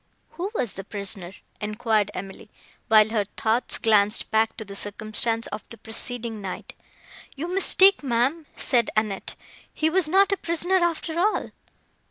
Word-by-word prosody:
"Who 365 Hz, +3 st, -4 dB
was 235 Hz, -, 0 dB
the 195 Hz, -, -7 dB
prisoner?" 195 Hz, -2 st, -1 dB, 0.3 s
enquired 215 Hz, -1 st, 0 dB
Emily, 195 Hz, +2 st, -8 dB, 0.4 s
while 215 Hz, -1 st, +6 dB
her 220 Hz, -2 st, +1 dB
thoughts 225 Hz, +3 st, 0 dB
glanced 210 Hz, -1 st, +2 dB
back 220 Hz, +1 st, +2 dB
to 220 Hz, -, -6 dB
the 200 Hz, 0 st, -9 dB
circumstance 215 Hz, +3 st, -2 dB
of 215 Hz, -, -6 dB
the 230 Hz, -, -9 dB
preceding 225 Hz, -1 st, -4 dB
night. 190 Hz, -2 st, -6 dB, 0.6 s
"You 300 Hz, +5 st, -4 dB
mistake, 385 Hz, +1 st, +5 dB
ma'am," 270 Hz, +4 st, 0 dB
said 240 Hz, -4 st, +2 dB
Annette; 210 Hz, -3 st, -1 dB, 0.4 s
"he 315 Hz, 0 st, 0 dB
was 360 Hz, -3 st, +2 dB
not 390 Hz, +4 st, +4 dB
a 395 Hz, -, +2 dB
prisoner, 345 Hz, +3 st, 0 dB
after 335 Hz, -1 st, -1 dB
all." 420 Hz, +4 st, +1 dB
225 Hz, 150 wpm, -25 LUFS, 210-320 Hz, 0.6 s, while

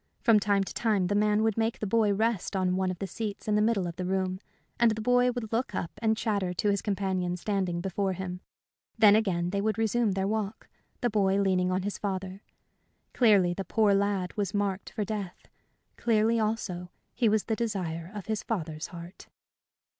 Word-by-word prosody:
From 225 Hz, -3 st, +6 dB
time 200 Hz, -1 st, +2 dB
to -, -, -7 dB
time 215 Hz, -5 st, +1 dB
the 180 Hz, -, 0 dB
man 210 Hz, +1 st, +3 dB
would 225 Hz, 0 st, +1 dB
make 225 Hz, +1 st, 0 dB
the -, -, -3 dB
boy 215 Hz, 0 st, +2 dB
rest 215 Hz, -1 st, 0 dB
on 185 Hz, -1 st, +1 dB
one 190 Hz, 0 st, 0 dB
of 185 Hz, -, -3 dB
the 195 Hz, -, -4 dB
seats 205 Hz, +2 st, -5 dB
in 210 Hz, -, +1 dB
the 210 Hz, -, +3 dB
middle 215 Hz, -4 st, +2 dB
of 170 Hz, -1 st, -5 dB
the 180 Hz, -, -3 dB
room, 185 Hz, 0 st, -1 dB, 0.4 s
and 235 Hz, -1 st, +5 dB
the 220 Hz, 0 st, -2 dB
boy 245 Hz, +2 st, +3 dB
would 235 Hz, -3 st, -5 dB
look 240 Hz, +3 st, -1 dB
up 170 Hz, -, -3 dB
and 220 Hz, -1 st, +2 dB
chatter 200 Hz, -6 st, -1 dB
to 190 Hz, +5 st, +1 dB
his 200 Hz, -, 0 dB
companion 190 Hz, -3 st, -1 dB
standing 185 Hz, -3 st, -1 dB
before 195 Hz, +1 st, -1 dB
him. 180 Hz, 0 st, -5 dB, 0.6 s
Then 210 Hz, -2 st, +7 dB
again 180 Hz, -5 st, +1 dB
they 200 Hz, 0 st, 0 dB
would 215 Hz, 0 st, 0 dB
resume 225 Hz, -1 st, +1 dB
their 190 Hz, 0 st, -1 dB
walk, 215 Hz, 0 st, -3 dB, 0.3 s
the 240 Hz, -, +1 dB
boy 195 Hz, -2 st, +2 dB
leaning 185 Hz, -2 st, +2 dB
on 185 Hz, 0 st, 0 dB
his 205 Hz, 0 st, -3 dB
father. 190 Hz, -1 st, -4 dB, 0.7 s
Clearly 200 Hz, -7 st, +4 dB
the 195 Hz, -, -4 dB
poor 210 Hz, 0 st, +2 dB
lad 195 Hz, -2 st, 0 dB
was 200 Hz, -2 st, -2 dB
marked 200 Hz, -1 st, -1 dB
for 210 Hz, -, -3 dB
death; 200 Hz, -4 st, -5 dB, 0.5 s
clearly, 225 Hz, 0 st, +2 dB
also, 210 Hz, -5 st, -2 dB, 0.2 s
he 230 Hz, -, +2 dB
was 215 Hz, -1 st, +2 dB
the 225 Hz, -, -1 dB
desire 185 Hz, -7 st, -3 dB
of 205 Hz, -, -6 dB
his 220 Hz, -1 st, -2 dB
father's 160 Hz, -7 st, -4 dB
heart. 170 Hz, +1 st, -11 dB
200 Hz, 200 wpm, -28 LUFS, 185-220 Hz, 0.7 s, Then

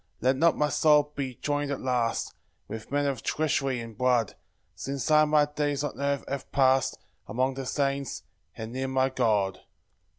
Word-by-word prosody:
5 -, -, -38 dB
Let 130 Hz, +3 st, +3 dB
not 165 Hz, +3 st, +3 dB
my 150 Hz, 0 st, +2 dB
soul 150 Hz, -1 st, +4 dB
be 135 Hz, -3 st, -3 dB
join'd 145 Hz, +1 st, -2 dB
at 140 Hz, -, -2 dB
last 125 Hz, -3 st, -1 dB, 0.3 s
With 110 Hz, +2 st, -8 dB
men 145 Hz, 0 st, +1 dB
of 135 Hz, -5 st, -1 dB
treachery 135 Hz, -2 st, 0 dB
and 115 Hz, -1 st, -8 dB
blood, 125 Hz, -2 st, +2 dB, 0.4 s
Since 140 Hz, +2 st, -3 dB
I 155 Hz, 0 st, +6 dB
my 150 Hz, -1 st, +4 dB
days 145 Hz, -1 st, -1 dB
on 145 Hz, -, -4 dB
earth 140 Hz, -1 st, 0 dB
have 140 Hz, -1 st, -5 dB
past 135 Hz, -1 st, +3 dB, 0.3 s
Among 130 Hz, +5 st, 0 dB
the 135 Hz, -1 st, -5 dB
saints, 140 Hz, -1 st, -1 dB, 0.3 s
and 110 Hz, 0 st, -6 dB
near 130 Hz, +2 st, -2 dB
my 130 Hz, 0 st, +2 dB
God. 105 Hz, -7 st, +1 dB
135 Hz, 175 wpm, -27 LUFS, 125-145 Hz, 0.4 s, I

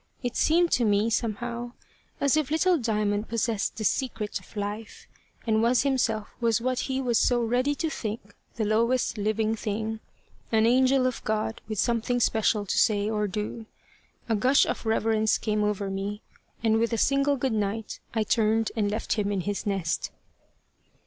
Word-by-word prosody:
It 245 Hz, -1 st, -2 dB
seemed 340 Hz, +2 st, +3 dB
to 245 Hz, -, +3 dB
me, 210 Hz, +1 st, +2 dB
somehow, 235 Hz, +2 st, -2 dB, 0.5 s
as 280 Hz, 0 st, +3 dB
if 310 Hz, -4 st, 0 dB
little 335 Hz, +2 st, +3 dB
Diamond 210 Hz, -2 st, -1 dB
possessed 230 Hz, -2 st, -1 dB
the 220 Hz, -, -3 dB
secret 220 Hz, -2 st, -1 dB
of 185 Hz, +4 st, -16 dB
life, 205 Hz, +2 st, -5 dB, 0.4 s
and 220 Hz, -1 st, +2 dB
was 240 Hz, +2 st, +3 dB
himself 245 Hz, -6 st, 0 dB
what 235 Hz, +2 st, +1 dB
he 265 Hz, -1 st, -2 dB
was 245 Hz, -4 st, +1 dB
so 240 Hz, -1 st, +2 dB
ready 250 Hz, +5 st, +1 dB
to 325 Hz, -, -1 dB
think 215 Hz, -7 st, -5 dB, 0.2 s
the 220 Hz, -, -1 dB
lowest 230 Hz, +2 st, +1 dB
living 215 Hz, +1 st, 0 dB
thing 220 Hz, +1 st, -3 dB, 0.5 s
an 220 Hz, -1 st, +4 dB
angel 260 Hz, +2 st, +4 dB
of 255 Hz, -2 st, -2 dB
God 220 Hz, +1 st, -2 dB
with 215 Hz, -, -3 dB
something 235 Hz, +3 st, +1 dB
special 220 Hz, -2 st, +2 dB
to -, -, 0 dB
say 210 Hz, 0 st, +2 dB
or 210 Hz, -1 st, 0 dB
do. 210 Hz, +3 st, -5 dB, 0.6 s
A 225 Hz, -, +1 dB
gush 255 Hz, +6 st, +4 dB
of -, -, -4 dB
reverence 220 Hz, -1 st, +2 dB
came 210 Hz, -1 st, -1 dB
over 205 Hz, -1 st, -1 dB
me, 200 Hz, +2 st, -4 dB, 0.4 s
and 220 Hz, -1 st, +3 dB
with 230 Hz, +1 st, 0 dB
a -, -, +1 dB
single 275 Hz, +4 st, +2 dB
goodnight, 220 Hz, -4 st, -2 dB, 0.2 s
I 220 Hz, -, +2 dB
turned 220 Hz, +1 st, +1 dB
and 210 Hz, -3 st, +1 dB
left 215 Hz, +2 st, -1 dB
him 205 Hz, -2 st, -1 dB
in 195 Hz, -2 st, -1 dB
his 205 Hz, +3 st, -3 dB
nest. 190 Hz, -5 st, -1 dB
225 Hz, 170 wpm, -27 LUFS, 210-245 Hz, 0.6 s, an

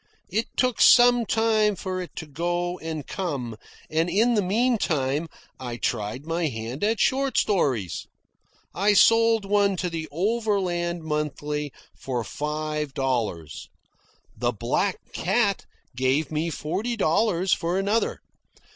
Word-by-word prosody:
It 220 Hz, +5 st, 0 dB
took 255 Hz, -2 st, +1 dB
some 245 Hz, -2 st, +7 dB
time 220 Hz, -2 st, +2 dB
for 185 Hz, 0 st, -4 dB
it 180 Hz, -, -9 dB
to 160 Hz, -, -6 dB
go 175 Hz, +4 st, -2 dB
and 160 Hz, -3 st, -5 dB
come, 140 Hz, -, -4 dB, 0.3 s
and 165 Hz, +2 st, 0 dB
in 230 Hz, +6 st, +3 dB
the 210 Hz, -, +3 dB
meantime 180 Hz, -, +1 dB, 0.3 s
I 120 Hz, -2 st, -5 dB
tried 110 Hz, +5 st, -3 dB
my 165 Hz, 0 st, 0 dB
hand 115 Hz, -, -5 dB
at 220 Hz, 0 st, +1 dB
short 270 Hz, +1 st, +1 dB
stories. 130 Hz, -, 0 dB, 0.7 s
I 205 Hz, +3 st, +3 dB
sold 225 Hz, -1 st, +5 dB
one 200 Hz, -1 st, +2 dB
to 180 Hz, 0 st, -2 dB
the 160 Hz, -1 st, -4 dB
"Overland 180 Hz, -3 st, -1 dB
Monthly" 150 Hz, -1 st, -3 dB, 0.2 s
for 125 Hz, -3 st, -3 dB
five 150 Hz, +1 st, -3 dB
dollars. 115 Hz, -, -2 dB, 0.7 s
The 120 Hz, 0 st, 0 dB
"Black 125 Hz, -, -1 dB, 0.2 s
Cat" 200 Hz, +1 st, 0 dB, 0.3 s
gave 130 Hz, +4 st, +1 dB
me 155 Hz, +2 st, -1 dB
forty 200 Hz, +10 st, -3 dB
dollars 185 Hz, 0 st, +2 dB
for 170 Hz, +2 st, -1 dB
another. 205 Hz, +4 st, 0 dB
175 Hz, 130 wpm, -25 LUFS, 145-205 Hz, 0.7 s, some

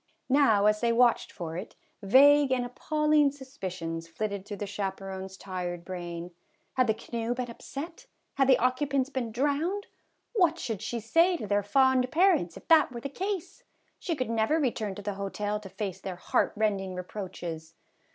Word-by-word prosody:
Now 255 Hz, -7 st, +4 dB
as 210 Hz, 0 st, +3 dB
they 235 Hz, -1 st, +3 dB
watched 240 Hz, 0 st, +3 dB
for 165 Hz, -4 st, -6 dB
it, 185 Hz, -, -7 dB, 0.3 s
vague 280 Hz, +6 st, +6 dB
and 250 Hz, -1 st, +1 dB
appalling 300 Hz, +3 st, +2 dB
suspicions 185 Hz, -12 st, -6 dB
flitted 200 Hz, +3 st, -4 dB
through 205 Hz, -, -5 dB
the 205 Hz, -, -3 dB
chaperon's 190 Hz, -1 st, -5 dB
tired 180 Hz, -2 st, -5 dB
brain. 175 Hz, -1 st, -6 dB, 0.4 s
Had 255 Hz, -1 st, +2 dB
the 220 Hz, -, +2 dB
canoe 235 Hz, +1 st, -3 dB
been 245 Hz, -1 st, -4 dB
upset? 330 Hz, -, -8 dB, 0.3 s
Had 270 Hz, -1 st, +2 dB
the 260 Hz, -, +6 dB
occupants 270 Hz, +2 st, +1 dB
been 250 Hz, -4 st, -2 dB
drowned? 295 Hz, -, 0 dB, 0.5 s
What 350 Hz, -7 st, +3 dB
should 225 Hz, -, -4 dB
she 240 Hz, -, -3 dB
say 335 Hz, -, +3 dB
to 215 Hz, -, -5 dB
their 205 Hz, 0 st, +2 dB
fond 255 Hz, +4 st, +3 dB
parents 335 Hz, -, +3 dB
if -, -, -14 dB
that 315 Hz, -5 st, +6 dB
were 240 Hz, -1 st, -6 dB
the 280 Hz, -, -4 dB
case? 375 Hz, +3 st, -4 dB, 0.4 s
She 335 Hz, -, -2 dB
could 255 Hz, -5 st, -2 dB
never 230 Hz, +8 st, +2 dB
return 225 Hz, -8 st, -1 dB
to 205 Hz, -, -8 dB
the 205 Hz, 0 st, -2 dB
hotel 205 Hz, +1 st, -2 dB
to 200 Hz, -2 st, -10 dB
face 195 Hz, -1 st, -5 dB
their 190 Hz, -2 st, -5 dB
heartrending 195 Hz, 0 st, 0 dB
re 180 Hz, -, -4 dB
proaches. 170 Hz, -5 st, -7 dB
230 Hz, 170 wpm, -28 LUFS, 195-280 Hz, 0.5 s, vague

